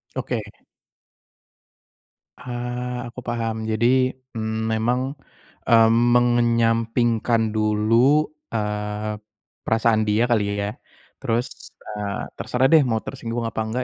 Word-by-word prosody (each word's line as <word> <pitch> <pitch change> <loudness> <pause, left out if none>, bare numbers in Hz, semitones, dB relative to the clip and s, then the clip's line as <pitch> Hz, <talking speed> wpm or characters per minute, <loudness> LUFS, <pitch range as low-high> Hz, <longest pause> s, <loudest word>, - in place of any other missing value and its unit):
Oke. 125 -3 -2 2.0
Eee, 125 0 -4
aku 125 - -9
paham. 115 -1 -2
Jadi, 125 +4 +2 0.2
mmm, 110 0 -2
memang, 115 +3 +1 0.7
eee, 115 -2 +6
mengenyampingkan 115 -1 +2
dulu, 110 +7 +3 0.3
eee, 105 0 -3 0.5
perasaan 110 -1 +2
dia 105 +2 +2
kali 100 -3 +1
ya. 100 0 -2 0.5
Terus, 115 +2 -1 0.4
eee, 105 -1 -4 0.2
terserah 125 +2 +1
deh 160 -3 +7
mau 110 -2 -1
tersinggung 115 +1 -4
apa 115 -1 -3
enggak, 125 +3 -2
115 Hz, 100 wpm, -23 LUFS, 110-120 Hz, 2.0 s, deh